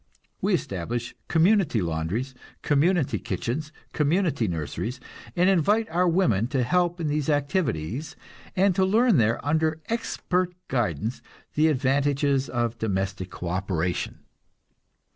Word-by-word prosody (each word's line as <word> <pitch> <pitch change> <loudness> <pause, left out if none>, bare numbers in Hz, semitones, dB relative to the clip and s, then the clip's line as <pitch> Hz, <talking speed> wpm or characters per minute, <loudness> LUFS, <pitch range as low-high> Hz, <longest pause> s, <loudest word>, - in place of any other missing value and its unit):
We - - +3
establish 115 +6 -3
community 175 - +3
laundries, 85 +9 -2 0.3
community 145 - +2
kitchens, 130 - -3 0.2
community 150 - +1
nurseries, 90 - -3 0.4
and 180 +1 +3
invite 200 +4 +3
our 180 +2 +2
women 120 - +2
to 130 -1 0
help 175 +6 +1
in 165 - -2
these 150 0 -1
activities, 145 - -1 0.4
and 190 +1 +4
to 190 - +2
learn 220 +1 +4
there, 115 -1 +2
under 155 +1 +1
expert 185 -5 -1
guidance, 110 - -1 0.3
the 155 +1 +3
advantages 140 -1 +1
of 120 -1 -1
domestic 95 -3 -2
co 90 - -6
operation. 90 -1 -2
140 Hz, 120 wpm, -26 LUFS, 110-170 Hz, 0.4 s, and